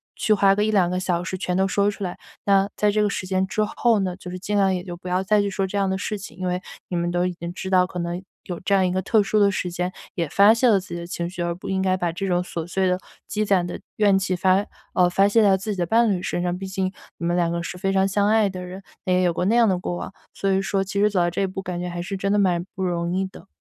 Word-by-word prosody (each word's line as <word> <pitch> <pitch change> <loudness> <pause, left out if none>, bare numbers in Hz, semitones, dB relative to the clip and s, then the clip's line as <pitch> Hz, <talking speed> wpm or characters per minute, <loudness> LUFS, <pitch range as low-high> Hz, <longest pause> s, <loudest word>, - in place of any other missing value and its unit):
去 215 - +2
花 195 -1 +4
个 210 - +1
1-2 205 -5 +3
个 180 +1 -1
小 180 -1 -1
时 185 0 -4
全 180 -1 -2
都 190 - +3
说 200 +1 +2
出 200 - -7
来。 180 -2 -4 0.3
那 195 0 +3
在 210 0 +3
这 210 +1 +1
个 210 - +2
时 190 - -3
间 190 0 +1
之 215 - 0
后 225 0 +2
呢， 185 -2 -1
就 180 -1 -9
是 185 - -6
尽 205 +3 -3
量 195 -1 +3
也 180 -1 -2
就 175 -2 -6
不 180 +1 -11
要 180 +1 +1
再 210 +2 +3
去 200 - -1
说 195 0 -1
这 200 - -3
样 195 -1 +1
的 190 - 0
事 210 +1 -3
情， 195 -4 -10
因 185 -1 -3
为 180 +1 -1 0.3
你 180 - -3
们 175 0 0
都 175 0 +1
已 180 - -1
经 170 0 -6
知 190 +1 -5
道， 185 -1 +4
可 180 -1 -6
能 170 +1 -3 0.2
有 175 -2 -6
这 200 - 0
样 190 -1 +4
一 - - -1
个 185 +1 0
特 210 +3 +3
殊 210 +1 +1
的 200 -1 +5
时 180 -2 -2
间 180 +1 -2 0.2
也 170 -4 -1
发 200 +6 +6
泄 230 +2 +2
了 205 -3 +5
自 190 - -12
己 - - -3
的 170 - -6
情 170 -1 -3
绪， 180 0 -6
而 170 0 0
不 175 - -10
应 190 0 0
该 185 -1 +2
把 175 -2 -1
这 195 +3 -4
种 180 -1 +2
琐 170 -2 -5
碎 190 +1 0
的 180 0 +2 0.3
积 215 0 -1
攒 190 -3 +2
的 175 - -6 0.2
怨 205 -2 +4
气 190 -1 0
发 190 +3 +3 0.3
呃， 180 -1 +4
发 195 +3 +4
泄 225 +3 +4
在 195 -2 +5
自 210 +3 -4
己 - - -7
的 175 - +1
伴 230 +4 +3
侣 180 -2 -1
身 175 - -2
上， 175 0 -1
毕 195 - -6
竟 190 -1 -2 0.3
你 170 - -4
们 175 +1 +1
两 170 -1 +1
个 170 0 -2
是 180 - -6
非 195 +1 0
常 195 0 +3
相 200 +1 +1
爱 215 -1 +4
的 185 -1 -6
人， 185 +2 -8 0.2
那 185 - +2
也 180 0 +3
有 175 -1 +2
过 180 - -1
那 220 - +3
样 235 -1 +5
的 190 -3 +2
过 175 0 -3
往。 - - -6 0.2
所 195 - -1
以 190 0 +2
说 195 0 0
其 200 +1 -3
实 210 - +5
走 200 - 0
到 175 0 +3
这 175 - -2
一 195 - +1
步， 190 +1 -5
感 180 -2 -4
觉 180 - -3
还 175 0 -4
是 190 +3 -4
真 195 +1 -1
的 205 - +3
蛮 180 -3 +2
不 190 - -3
容 175 -1 -1
易 190 +1 0
的。 190 +1 -12
190 Hz, 345 characters per minute, -23 LUFS, 180-200 Hz, 0.3 s, 发